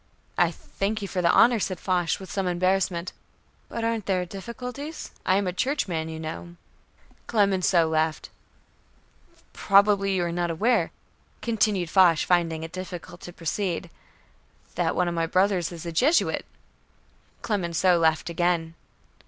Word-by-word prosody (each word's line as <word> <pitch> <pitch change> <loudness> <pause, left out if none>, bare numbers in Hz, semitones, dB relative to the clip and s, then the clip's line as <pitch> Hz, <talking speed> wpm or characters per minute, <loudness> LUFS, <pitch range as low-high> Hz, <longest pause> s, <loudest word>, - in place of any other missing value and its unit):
"I - - +3
thank 210 +2 -4
you - - -3
for 185 - -2
the 170 - +3
honor," 235 -1 +5
said 185 -3 -2
Foch 180 -3 0
with 190 -2 -9
some 195 -2 -1
embarrassment, 185 0 0 0.6
"but 230 - -4
aren't 230 -3 -1
there 185 -2 +1
difficulties? 250 - -7 0.2
I 185 - +4
am 200 0 +1
a 180 - -2
Churchman, 180 - -1
you 160 0 -6
know." 165 +2 -7 0.7
Clemenceau 190 -6 +3
laughed. 160 0 -1 1.2
"Probably 200 -1 +3
you 180 - +1
are 170 - -2
not 175 0 -1
aware," 220 +9 +1 0.5
continued 210 -7 0
Foch, 180 -4 +6
finding 165 -1 +1
it 165 - -7
difficult 180 -1 -8
to 175 - -8
proceed, 175 0 -3 0.8
"that - - 0
one 180 - +1
of 175 - -1
my 165 -1 0
brothers 185 -1 +1
is 170 -1 -8
a 170 - -4
Jesuit." 275 - +2 1.0
Clemenceau 180 -3 +1
laughed 160 +1 +1
again. 170 -1 0
180 Hz, 145 wpm, -25 LUFS, 170-200 Hz, 1.2 s, Foch